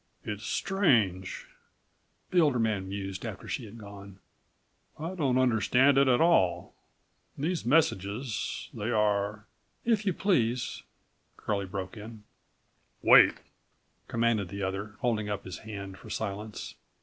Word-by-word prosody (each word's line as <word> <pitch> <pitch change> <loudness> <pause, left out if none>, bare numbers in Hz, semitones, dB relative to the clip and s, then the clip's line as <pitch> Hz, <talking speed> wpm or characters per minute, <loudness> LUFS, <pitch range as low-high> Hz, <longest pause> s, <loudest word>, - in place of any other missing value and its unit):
"It's 105 +1 -5
strange," 115 - +1 0.9
the 180 - +4
older 145 -6 +4
man 105 -5 0
mused 95 -2 -5
after - - -6
she - - -3
had 110 +2 -11
gone. 100 -2 -11 0.8
"I 165 +4 -4
don't 140 -8 +1
understand 130 +2 +4
it 140 - +4
at 125 -2 +4
all. 95 - +3 0.6
These 160 -3 -2
messages, 115 - 0
they 105 +3 -3
are—" 105 -1 +1 0.4
"If 225 -3 +2
you 195 -2 +1
please—" 125 - 0 0.6
Curlie 100 -2 -2
broke 95 +3 -5
in. 110 0 -10 0.8
"Wait!" - - +8 0.7
commanded 115 -5 +1
the 100 +1 -5
other, 100 +2 -4
holding 110 -4 0
up 100 -1 -4
his 95 -2 -7
hand 100 -3 -8
for - - -12
silence. 105 0 -5
110 Hz, 125 wpm, -29 LUFS, 100-130 Hz, 0.9 s, Wait